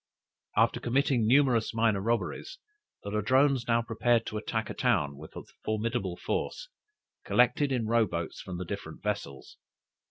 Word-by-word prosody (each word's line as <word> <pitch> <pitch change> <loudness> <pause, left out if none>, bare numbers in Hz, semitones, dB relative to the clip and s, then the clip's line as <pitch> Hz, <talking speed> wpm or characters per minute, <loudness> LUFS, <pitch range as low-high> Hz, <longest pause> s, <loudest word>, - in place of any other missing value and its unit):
After - - +3
committing 125 -2 +1
numerous 125 -3 +3
minor 110 -3 +2
robberies, 115 - -2 0.5
"The 100 - -5
Ladrones 130 +4 +2
now 115 0 +2
prepared 115 0 +1
to 110 - -4
attack 110 +1 -3
a - - -4
town 70 -1 +1
with 75 +3 -12
a - - -7 0.2
formidable 110 -4 -2
force, - - -3 0.5
collected 125 +4 +3
in 125 -4 0
row 115 0 +3
boats 85 -2 -4
from 90 -2 -6
the 90 - -4
different 85 -4 -7
vessels. 100 -10 -4
115 Hz, 150 wpm, -29 LUFS, 100-120 Hz, 0.5 s, After